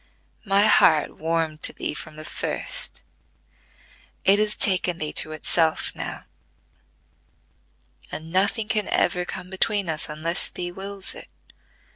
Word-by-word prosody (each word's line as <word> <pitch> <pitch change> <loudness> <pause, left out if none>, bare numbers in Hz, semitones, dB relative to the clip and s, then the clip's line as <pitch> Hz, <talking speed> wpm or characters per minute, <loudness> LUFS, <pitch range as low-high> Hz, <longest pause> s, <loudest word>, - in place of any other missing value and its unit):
My 200 +1 +4
heart 155 -7 +5
warmed 160 -1 -1
to - - +1
thee - - -3
from 155 0 -8
the 155 0 -8
first: - - -4 1.2
it 200 +2 +6
has 215 0 +1
taken 180 -3 +3
thee 155 -2 -3
to 155 - -2
itself 160 +1 +1
now; - - -5 1.9
and 160 +1 -6
nothing 200 +4 +2
can 210 -2 0
ever 180 0 +1
come 180 +1 -6
between 200 0 +1
us, 155 -1 -2
unless 155 +3 -2
thee 175 0 -5
wills 195 +1 -6
it. - - -10
180 Hz, 130 wpm, -24 LUFS, 160-200 Hz, 1.9 s, it